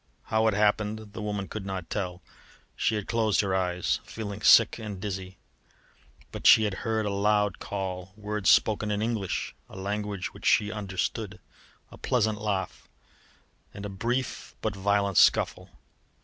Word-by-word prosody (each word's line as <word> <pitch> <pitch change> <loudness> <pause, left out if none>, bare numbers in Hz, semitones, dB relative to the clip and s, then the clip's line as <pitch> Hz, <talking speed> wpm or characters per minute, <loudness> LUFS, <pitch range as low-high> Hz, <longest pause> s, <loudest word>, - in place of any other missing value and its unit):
How 110 0 +1
it 110 - +2
happened 105 0 0
the 110 - -6
woman 105 -2 -3
could 110 - -6
not 95 -3 -5
tell. 90 -3 -3 0.5
She 110 - +1
had 105 -2 -3
closed 110 -3 +2
her 100 -2 -1
eyes, 90 -1 0
feeling 105 -2 -6
sick 115 +2 +6
and 105 -4 -6
dizzy; 95 -1 -5 0.9
but - - -1
she 110 - +8
had 105 -2 0
heard 110 -1 -1
a 100 - -1
loud 105 0 +1
call, 95 -2 -5
words 105 -3 -1
spoken 105 0 +4
in 105 0 0
English 110 -5 -2 0.2
(a - - -12
language 100 -1 -3
which - - -5
she 105 -1 +4
understood), 100 0 -3 0.5
a - - -13
pleasant 110 -3 0
laugh, 100 -3 -3 0.9
and 100 - -7
a - - -4
brief 120 +6 -3
but 110 -3 -2
violent 100 0 +1
scuffle. - - +4
105 Hz, 155 wpm, -27 LUFS, 95-110 Hz, 0.9 s, she